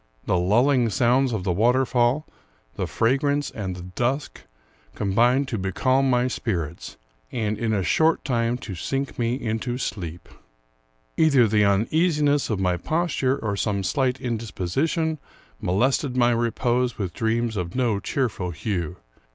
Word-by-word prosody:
The - - +1
lulling 120 +6 +3
sounds 125 +4 +2
of 110 -5 -2
the 95 - 0
water 120 +8 +3
fall, 125 +5 +1 0.5
the - - -3
fragrance, 140 +4 +1
and 95 -4 -4
the 90 - -8
dusk, 120 +10 -2 0.5
combined 120 +7 +2
to 115 - -2
becalm 130 +8 +1
my 125 0 +2
spirits, 85 - -4 0.3
and, 110 -2 -1
in 115 0 -2
a 100 -3 +1
short 160 - +2
time, 120 -2 0
to 100 - -5
sink 135 +11 -3
me 120 +1 +1
into 120 0 -3
sleep. 85 -9 -5 0.9
Either 140 -7 +5
the 105 0 +3
uneasiness 145 - +2
of 105 -4 -1
my 90 -2 +1
posture, 150 - 0
or 110 -6 -2
some 100 -1 -1
slight 130 +7 0
indisposition, 125 - -2 0.4
molested 130 - +1
my 120 -1 +4
repose 120 +1 0
with 95 -5 -3
dreams 115 +1 0
of 90 -3 -4
no 120 -6 +1
cheerful 105 -5 -2
hue. 90 -1 -3
120 Hz, 145 wpm, -24 LUFS, 100-130 Hz, 0.9 s, Either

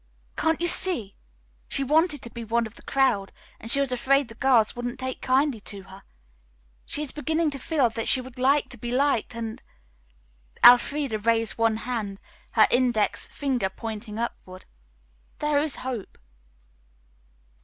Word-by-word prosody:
Can't 320 -1 0
you 345 - -1
see? 330 - +2 0.5
She 275 - -2
wanted 305 +2 +2
to 235 - -6
be 235 0 -7
one 230 +1 0
of 220 - -10
the - - -16
crowd 250 -8 0 0.3
and 225 - -8
she 275 - +7
was 275 -2 +1
afraid 265 +2 +1
the - - -9
girls 240 -3 +2
wouldn't 245 +1 -5
take 260 0 -4
kindly 265 -1 +1
to 200 -1 -4
her. 190 +1 -14 0.9
She 300 - -1
is 280 - -3
beginning 315 +1 -1
to 275 - -4
feel 280 -2 +1
that 225 0 -3
she 260 - +7
would 255 0 -10
like 275 +3 +2
to 245 - -11
be 240 - -5
liked, 255 -2 0
and," 225 -1 -6 1.0
Elfreda 250 -1 +5
raised 225 -1 0
one 225 -1 +2
hand, 215 -6 -4 0.3
her 220 - +6
index 240 -4 +1
finger 255 -9 -2
pointing 215 +1 -7
upward, 185 -5 -6 0.7
"'There 295 -1 +1
is 300 0 -1
hope.'" 250 -6 -6
245 Hz, 160 wpm, -25 LUFS, 225-275 Hz, 1.0 s, she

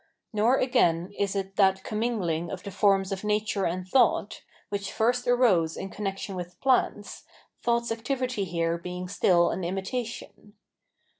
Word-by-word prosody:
Nor, 225 +5 +3
again, 190 -8 +2
is 200 0 -1
it 195 0 -4
that 190 -1 +3
com 215 - -4
mingling 175 -8 -1
of 185 - -6
the 200 - -6
forms 195 0 +2
of 195 0 -4
nature 210 -1 0
and 180 +2 -4
thought, 260 +7 +2 0.3
which 200 -1 -3
first 245 +2 +1
arose 210 -10 +3
in 195 - -6
connection 195 -1 -4
with 180 -1 -7
plants, 250 -6 0 0.4
thought's 235 -1 0
activity 250 -1 -2
here 170 -1 -1
being 180 +1 -6
still 175 -2 +3
an 185 - -3
imitation. 205 +3 -5
200 Hz, 150 wpm, -27 LUFS, 180-230 Hz, 0.4 s, Nor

